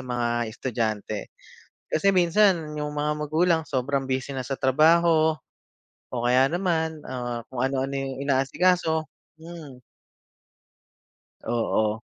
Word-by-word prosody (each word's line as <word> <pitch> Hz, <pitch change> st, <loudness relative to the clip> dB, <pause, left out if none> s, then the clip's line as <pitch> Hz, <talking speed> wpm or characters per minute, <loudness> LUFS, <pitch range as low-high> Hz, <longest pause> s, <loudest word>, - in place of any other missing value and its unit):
mga 120 Hz, -2 st, -1 dB
estudyante. 110 Hz, -3 st, -3 dB, 0.6 s
Kasi 195 Hz, +5 st, +2 dB
minsan 175 Hz, -4 st, +3 dB
yung 150 Hz, 0 st, -4 dB
mga 150 Hz, +1 st, 0 dB, 0.2 s
magulang 165 Hz, +2 st, +2 dB
sobrang 135 Hz, 0 st, -1 dB
busy 130 Hz, +1 st, -2 dB
na 130 Hz, -2 st, -5 dB
sa 135 Hz, -, -2 dB
trabaho 160 Hz, +4 st, +4 dB, 0.8 s
o 120 Hz, -2 st, -3 dB
kaya 130 Hz, +2 st, +4 dB
naman, 165 Hz, -3 st, -1 dB
ah, 120 Hz, -2 st, -5 dB
kung 125 Hz, -2 st, -4 dB
ano-ano 135 Hz, +1 st, -1 dB
yung 135 Hz, 0 st, -4 dB
inaasikaso, 160 Hz, +4 st, +1 dB, 0.3 s
hmm. 160 Hz, -6 st, -10 dB, 1.7 s
Oo. 110 Hz, -2 st, 0 dB
140 Hz, 110 wpm, -25 LUFS, 125-160 Hz, 1.7 s, trabaho